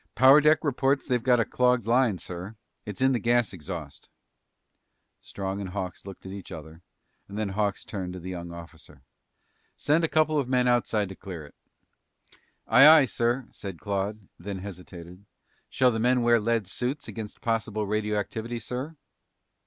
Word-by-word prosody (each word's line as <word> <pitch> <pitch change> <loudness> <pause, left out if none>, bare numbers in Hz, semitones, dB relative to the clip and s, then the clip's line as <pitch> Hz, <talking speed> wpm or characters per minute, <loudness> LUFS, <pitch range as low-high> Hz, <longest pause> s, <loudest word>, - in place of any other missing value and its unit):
"Power 135 +3 +7
deck 155 +2 +4
reports 135 -1 +1
they've 125 -3 0
got 125 0 +3
a 115 - +2
clogged 125 -3 +1
line, 120 -3 +2
sir. 90 +5 -7 0.3
It's 105 +3 -6
in 130 0 +4
the 125 - +1
gas 120 -2 +1
exhaust." 85 -4 -8 1.1
Strong 95 0 -5
and 95 - -5
Hawks 95 0 -6
looked 95 - -10
at 95 - -7
each 100 -1 -9
other, 80 +1 -10 0.5
and 100 - -8
then 105 -2 -1
Hawks 100 +1 -1
turned 95 -4 -5
to 90 - -7
the 90 +2 -7
young 85 -1 -6
officer. 80 -4 -12 0.7
"Send 155 +3 +2
a - - +3
couple 155 -1 +2
of 130 -3 -2
men 125 -1 +2
outside 115 -4 +1
to 95 - -8
clear 85 -6 -8
it." 70 - -16 1.1
"Aye, 140 - +7
aye, 155 -3 +8
sir," 120 +1 -1
said 95 -4 -7
Claude, 100 +1 -2
and 95 - -26
then 100 +2 -5
hesitated. 90 -1 -10 0.5
"Shall 125 -1 +3
the 110 - -2
men 125 +1 +2
wear 120 0 +4
lead 115 -1 0
suits 125 +9 -4
against 110 -2 -7
possible 110 -2 -1
radioactivity, 105 +3 -2
sir?" 125 +7 -5
110 Hz, 170 wpm, -27 LUFS, 95-125 Hz, 1.1 s, aye